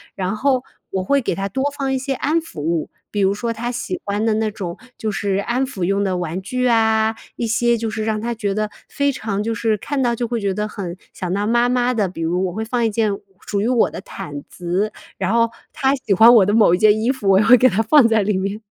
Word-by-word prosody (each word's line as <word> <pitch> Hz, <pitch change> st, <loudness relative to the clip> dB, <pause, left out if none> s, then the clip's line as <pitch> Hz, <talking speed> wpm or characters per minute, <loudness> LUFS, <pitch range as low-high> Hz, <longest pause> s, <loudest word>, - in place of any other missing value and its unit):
然 190 Hz, +1 st, -2 dB
后 255 Hz, +2 st, +1 dB, 0.3 s
我 190 Hz, -1 st, -1 dB
会 280 Hz, +8 st, +2 dB
给 230 Hz, -, -1 dB
他 195 Hz, +2 st, -2 dB
多 265 Hz, +7 st, -2 dB
放 270 Hz, -2 st, -1 dB
一 -, -, +1 dB
些 270 Hz, +1 st, -2 dB
安 300 Hz, +6 st, 0 dB
抚 325 Hz, -, -10 dB
物， 160 Hz, +1 st, -1 dB, 0.2 s
比 205 Hz, -, -2 dB
如 195 Hz, 0 st, +3 dB
说 230 Hz, +2 st, -2 dB
他 240 Hz, +2 st, -3 dB
喜 295 Hz, +9 st, -4 dB
欢 205 Hz, +2 st, -1 dB
的 225 Hz, -, +2 dB
那 220 Hz, 0 st, 0 dB
种 180 Hz, -3 st, -6 dB, 0.2 s
就 220 Hz, -, -2 dB
是 200 Hz, -1 st, -1 dB
安 240 Hz, +6 st, 0 dB
抚 235 Hz, -9 st, -5 dB
用 195 Hz, +3 st, +1 dB
的 190 Hz, -2 st, 0 dB
玩 175 Hz, 0 st, -3 dB
具 250 Hz, +6 st, -2 dB
啊， 220 Hz, -1 st, +3 dB, 0.2 s
一 235 Hz, -, -2 dB
些 235 Hz, +1 st, +2 dB
就 225 Hz, 0 st, -2 dB
是 220 Hz, 0 st, -3 dB
让 215 Hz, -1 st, -1 dB
他 235 Hz, +2 st, -2 dB
觉 210 Hz, -3 st, -2 dB
得 215 Hz, 0 st, -1 dB, 0.2 s
非 280 Hz, 0 st, +1 dB
常 215 Hz, -6 st, -3 dB
就 225 Hz, +1 st, -1 dB
是 225 Hz, -1 st, +1 dB
看 280 Hz, +6 st, -3 dB
到 240 Hz, -2 st, +2 dB
就 240 Hz, +1 st, -2 dB
会 235 Hz, 0 st, -2 dB
觉 200 Hz, -1 st, 0 dB
得 210 Hz, 0 st, -1 dB
很 185 Hz, -4 st, -6 dB, 0.2 s
想 180 Hz, -2 st, -4 dB
到 200 Hz, +1 st, 0 dB
妈 240 Hz, +2 st, +3 dB
妈 250 Hz, 0 st, +1 dB
的， 210 Hz, -4 st, +1 dB
比 170 Hz, -, -8 dB
如 175 Hz, +3 st, 0 dB
我 -, -, -4 dB
会 220 Hz, +3 st, -3 dB
放 240 Hz, +1 st, -1 dB
一 -, -, +2 dB
件 215 Hz, 0 st, +1 dB, 0.4 s
属 200 Hz, -1 st, -1 dB
于 215 Hz, -, 0 dB
我 245 Hz, -2 st, +2 dB
的 -, -, -7 dB
毯 150 Hz, -7 st, -7 dB
子， 180 Hz, +4 st, -2 dB, 0.3 s
然 190 Hz, +2 st, 0 dB
后 230 Hz, 0 st, +3 dB, 0.2 s
他 265 Hz, 0 st, +1 dB
喜 245 Hz, -7 st, -1 dB
欢 225 Hz, +5 st, +8 dB
我 205 Hz, -5 st, +6 dB
的 205 Hz, -, +1 dB
某 215 Hz, -5 st, +5 dB
一 -, -, -4 dB
件 215 Hz, 0 st, +5 dB
衣 230 Hz, +4 st, +2 dB
服， 260 Hz, -7 st, -2 dB
我 190 Hz, 0 st, +6 dB
也 210 Hz, -, +3 dB
会 245 Hz, +3 st, +8 dB
给 255 Hz, -, +5 dB
它 215 Hz, -, +1 dB
放 255 Hz, +2 st, +6 dB
在 225 Hz, -1 st, +3 dB
里 200 Hz, -1 st, 0 dB
面。 195 Hz, +2 st, -3 dB
220 Hz, 285 characters per minute, -20 LUFS, 195-240 Hz, 0.4 s, 欢